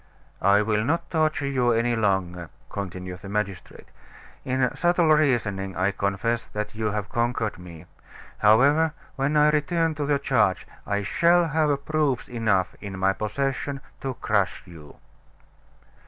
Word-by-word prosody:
"I 100 Hz, +2 st, +4 dB
will 105 Hz, 0 st, 0 dB
not 170 Hz, +7 st, -1 dB
torture 155 Hz, -3 st, +1 dB
you 125 Hz, -3 st, +2 dB
any 115 Hz, +1 st, +1 dB
longer," 95 Hz, -5 st, -1 dB, 0.2 s
continued 90 Hz, -2 st, -6 dB
the 95 Hz, -, -9 dB
magistrate. 100 Hz, -2 st, -4 dB, 0.6 s
"In 130 Hz, 0 st, 0 dB
subtle 175 Hz, -1 st, +2 dB
reasoning 105 Hz, -, +1 dB
I 95 Hz, +2 st, +2 dB
confess 100 Hz, +4 st, -1 dB
that 105 Hz, 0 st, -4 dB
you 110 Hz, 0 st, -2 dB
have 105 Hz, -1 st, -2 dB
conquered 115 Hz, -4 st, -1 dB
me. 85 Hz, -3 st, -11 dB, 0.5 s
However, 140 Hz, +9 st, +4 dB, 0.2 s
when 140 Hz, +2 st, 0 dB
I 150 Hz, 0 st, +5 dB
return 165 Hz, +2 st, +1 dB
to 145 Hz, -1 st, -3 dB
the 145 Hz, -1 st, +2 dB
charge 115 Hz, -9 st, +1 dB, 0.2 s
I 100 Hz, 0 st, -1 dB
shall 170 Hz, -, +3 dB
have 145 Hz, -2 st, 0 dB
proofs 150 Hz, -5 st, 0 dB
enough 110 Hz, -6 st, 0 dB
in 100 Hz, -2 st, -6 dB
my 95 Hz, +1 st, +2 dB
possession 135 Hz, +6 st, -2 dB, 0.2 s
to 135 Hz, -2 st, -3 dB
crush 100 Hz, -5 st, 0 dB
you." 80 Hz, -5 st, -13 dB
115 Hz, 140 wpm, -25 LUFS, 100-145 Hz, 0.6 s, I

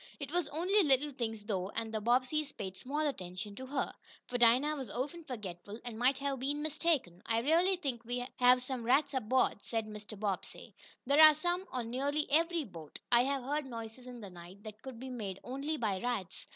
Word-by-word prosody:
It 285 Hz, -1 st, -5 dB
was 350 Hz, -1 st, +1 dB
only 365 Hz, +7 st, +3 dB
little 290 Hz, -2 st, +3 dB
things, 225 Hz, -5 st, -3 dB
though, 195 Hz, -3 st, -2 dB
and 225 Hz, -1 st, -3 dB
the 215 Hz, -, -1 dB
Bobbseys 255 Hz, +6 st, +2 dB
paid 190 Hz, -3 st, -5 dB
small 280 Hz, +9 st, -3 dB
attention 200 Hz, -8 st, -3 dB
to 260 Hz, -, -6 dB
her, 270 Hz, 0 st, -1 dB, 0.3 s
for 245 Hz, -, -3 dB
Dinah 250 Hz, +6 st, +5 dB
was 265 Hz, -6 st, -5 dB
often 290 Hz, -, -4 dB
forgetful, 210 Hz, -, -7 dB
and 230 Hz, -2 st, -5 dB
might 255 Hz, +2 st, +4 dB
have 275 Hz, -1 st, -2 dB
been 290 Hz, +3 st, -1 dB
mistaken. 305 Hz, -, 0 dB
"I 230 Hz, 0 st, +2 dB
really 340 Hz, +8 st, +4 dB
think 270 Hz, -10 st, -3 dB
we 245 Hz, +1 st, -3 dB
have 250 Hz, 0 st, +6 dB
some 255 Hz, -2 st, -3 dB
rats 270 Hz, +5 st, +3 dB
aboard," 260 Hz, -2 st, +2 dB
said 225 Hz, -2 st, -2 dB
Mr. 210 Hz, -1 st, -8 dB
Bobbsey. 200 Hz, -3 st, -4 dB, 0.3 s
"There 280 Hz, +4 st, +5 dB
are 310 Hz, -1 st, +10 dB
some 350 Hz, +4 st, -1 dB
on 235 Hz, -3 st, -3 dB
nearly 285 Hz, +4 st, 0 dB
every 330 Hz, +2 st, +3 dB
boat. 165 Hz, -, -10 dB
I 240 Hz, +1 st, +6 dB
have 275 Hz, -1 st, -1 dB
heard 290 Hz, +2 st, -1 dB
noises 230 Hz, +1 st, -7 dB
in 245 Hz, -2 st, -8 dB
the 200 Hz, -3 st, -8 dB
night 180 Hz, +3 st, -12 dB
that 215 Hz, 0 st, -9 dB
could 260 Hz, -3 st, -8 dB
be 260 Hz, +1 st, -6 dB
made 205 Hz, -6 st, -5 dB
only 275 Hz, +5 st, -3 dB
by 205 Hz, -7 st, -1 dB
rats." 240 Hz, -7 st, -3 dB
250 Hz, 205 wpm, -33 LUFS, 220-290 Hz, 0.3 s, are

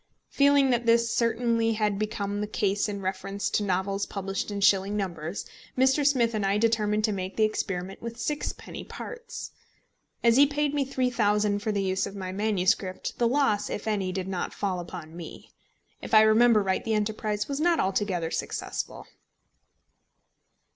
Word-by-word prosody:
Feeling 280 Hz, -1 st, +4 dB
that 240 Hz, -1 st, 0 dB
this 230 Hz, 0 st, +4 dB
certainly 230 Hz, -1 st, +1 dB
had 210 Hz, -2 st, 0 dB
become 205 Hz, -1 st, -2 dB
the 210 Hz, -, -2 dB
case 205 Hz, 0 st, 0 dB
in 200 Hz, -1 st, -4 dB
reference 195 Hz, +1 st, -3 dB
to -, -, +1 dB
novels 195 Hz, +1 st, -1 dB
published 195 Hz, 0 st, -3 dB
in 205 Hz, -1 st, -3 dB
shilling 200 Hz, +1 st, +3 dB
numbers, 175 Hz, -2 st, -4 dB, 0.3 s
Mr. 265 Hz, +3 st, +4 dB
Smith 250 Hz, -5 st, +3 dB
and 215 Hz, -2 st, -1 dB
I 195 Hz, +1 st, +2 dB
determined 215 Hz, -1 st, +1 dB
to 215 Hz, -, +2 dB
make 190 Hz, -1 st, -4 dB
the 220 Hz, -, +3 dB
experiment 195 Hz, -3 st, -2 dB
with 235 Hz, 0 st, -7 dB
sixpenny 295 Hz, +4 st, -4 dB
parts. 470 Hz, -1 st, -8 dB, 0.7 s
As 235 Hz, 0 st, +5 dB
he 285 Hz, +1 st, +7 dB
paid 295 Hz, 0 st, -1 dB
me 280 Hz, -2 st, 0 dB
£3000 210 Hz, -5 st, +1 dB
for 215 Hz, -, -1 dB
the 200 Hz, -1 st, 0 dB
use 190 Hz, +1 st, 0 dB
of 200 Hz, -, -9 dB
my 185 Hz, -2 st, -5 dB
MS., 200 Hz, -2 st, +2 dB, 0.4 s
the 240 Hz, -, +3 dB
loss, 240 Hz, -5 st, +1 dB
if 210 Hz, -, -5 dB
any, 200 Hz, -4 st, 0 dB
did 185 Hz, 0 st, -3 dB
not 185 Hz, -2 st, -3 dB
fall 190 Hz, -3 st, -1 dB
upon 170 Hz, -2 st, -8 dB
me. 170 Hz, -1 st, -10 dB, 0.5 s
If -, -, -1 dB
I 215 Hz, -, +9 dB
remember 220 Hz, 0 st, +5 dB
right, 190 Hz, -1 st, 0 dB
the 225 Hz, -1 st, 0 dB
enterprise 210 Hz, 0 st, -1 dB
was 280 Hz, 0 st, -3 dB
not 340 Hz, +1 st, +3 dB
altogether 190 Hz, -4 st, 0 dB
successful. -, -, -4 dB
210 Hz, 170 wpm, -27 LUFS, 195-235 Hz, 0.7 s, I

